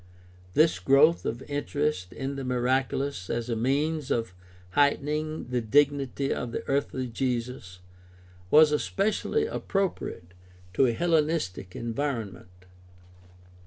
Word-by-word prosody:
This 155 - +4
growth 140 - +4
of 120 +4 -4
interest 145 -7 -2
in 135 +1 -4
the 135 - -5
miraculous 130 -2 -1
as 120 +1 -2
a - - 0
means 140 +5 0
of 115 -6 -1 0.4
heightening 150 +2 0
the 125 -1 0
dignity 140 +2 +2
of 125 - -4
the - - -5
earthly 135 -1 -1
Jesus 120 -6 -3 0.7
was 155 +4 +7
especially 210 - 0
appropriate 190 - -3 0.4
to 130 +7 +4
a 120 - +1
Hellenistic 155 - 0
environment. 110 -8 -4
135 Hz, 110 wpm, -27 LUFS, 115-150 Hz, 0.7 s, was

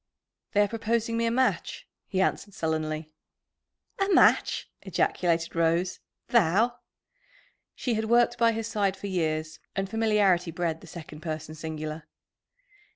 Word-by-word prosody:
"They 205 - +4
are 205 - +4
proposing 230 +1 -1
me 230 0 +1
a - - +3
match," 255 +2 0 0.2
he 190 -1 0
answered 200 +1 -1
sullenly. 155 -1 -2 0.9
"A 390 0 +1
match!" 370 - +4
ejaculated 170 -2 0
Rose. 170 +2 +1 0.3
"Thou!" 230 +3 +3 1.0
She 245 - -1
had 220 0 0
worked 240 +1 +3
by 230 -1 +5
his 225 0 -3
side 200 -4 0
for 200 - -8
years, 155 -4 -1 0.2
and 195 0 -1
familiarity 205 -5 +2
bred 165 -1 -2
the - - -13
second 160 -3 -9
person 155 -1 -5
singular. 155 0 -6
190 Hz, 135 wpm, -27 LUFS, 160-225 Hz, 1.0 s, by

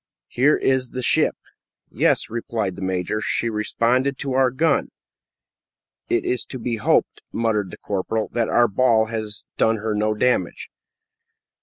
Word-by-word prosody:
Here 135 +5 +3
is 130 -1 +1
the 125 - -4
ship." - - +2 0.6
"Yes," - - +2
replied 110 -4 -3
the - - -9
major; 95 +3 -2
"she 115 +1 -1
responded 120 +5 0
to 135 -2 -3
our 130 0 +4
gun." 155 +6 +1 1.2
"It 360 +1 +1
is 370 +1 -1
to 130 - -6
be 120 -1 -3
hoped," 110 - +1
muttered 110 -4 0
the - - -10
corporal, 105 +2 -2
"that 115 -2 -1
our 120 0 +4
ball 110 +1 +3
has 110 -2 -4
done 115 - +3
her 110 +1 -2
no 105 +1 0
damage." 115 -5 0
115 Hz, 150 wpm, -22 LUFS, 105-130 Hz, 1.2 s, our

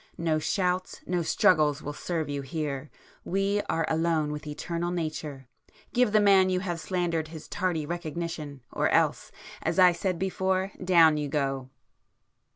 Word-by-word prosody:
No 160 -2 +1
shouts, 180 +2 -1
no 180 -1 0
struggles 150 -2 +3
will 145 - -4
serve 160 +1 -3
you 145 -1 -3
here,—we 155 +8 -3
are 165 -1 +1
alone 160 -2 +1
with 150 0 -6
Eternal 170 +3 -3
Nature,—give 155 - -3
the 215 - +5
man 195 -2 +5
you 185 0 0
have 175 -3 -3
slandered 170 -2 -1
his 155 -1 -10
tardy 175 -5 -1
recognition, 160 -4 -5
or - - +1
else, - - +1 0.3
as 165 +1 -1
I 180 -1 +8
said 180 +1 -2
before—down 185 -3 +2
you 145 -1 -2
go! 135 -2 -1
165 Hz, 140 wpm, -28 LUFS, 150-185 Hz, 0.3 s, I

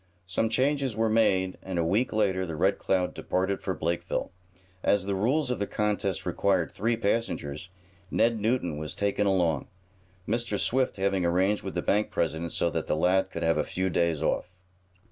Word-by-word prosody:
Some 95 +5 0
changes 135 +1 +1
were 110 0 +1
made 95 -4 +2
and, 95 -2 -5
a 85 - +2
week 100 +10 +1
later 100 -4 +1
the 85 -3 -4
Red 95 +5 +2
Cloud 90 -2 0
departed 95 +2 -1
for 95 - -2
Blakeville. 85 +1 -2 0.5
As 100 -2 +2
the 100 - -1
rules 125 +8 +1
of 125 - -2
the 100 - -1
contest 105 -3 -1
required 95 -4 +1
three 115 +3 0
passengers, 100 -8 -2 0.4
Ned 115 +2 +2
Newton 105 -8 0
was 75 -1 -4
taken 100 0 0
along, 85 -7 +1 0.6
Mr. 120 +2 -1
Swift 130 -2 +1
having 95 -1 +1
arranged 95 +4 +2
with 95 - -6
the 85 - -1
bank 105 +1 +1
president 80 0 -1
so - - 0
that - - -3
the - - +1
lad 90 +4 +2
could - - -5
have 80 0 +2
a - - +2
few 95 0 -2
days 85 -3 +1
off. 90 - 0
95 Hz, 185 wpm, -28 LUFS, 90-110 Hz, 0.6 s, made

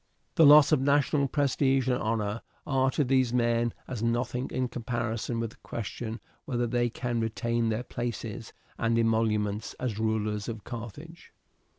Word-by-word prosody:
The 160 - +6
loss 150 +1 +8
of 150 -4 +4
national 140 0 +2
prestige 135 -2 +1
and 125 -1 +1
honour 110 0 -1 0.2
are 135 -2 +2
to 145 - +1
these 130 -2 +2
men 120 -1 +2 0.2
as 120 -4 -5
nothing 120 +2 -1
in 130 0 -1
comparison 120 -1 -3
with 115 -1 -2
the - - -17
question 115 +1 -5 0.3
whether 120 -5 -1
they 120 0 +1
can 120 0 -2
retain 115 +1 0
their 110 +2 -1
places 120 -2 -5 0.3
and 115 0 +1
emoluments 110 -2 +1
as 115 -5 -3
rulers 110 -1 -1
of 110 -2 -6
Carthage. 130 - -9
120 Hz, 155 wpm, -28 LUFS, 115-130 Hz, 0.3 s, loss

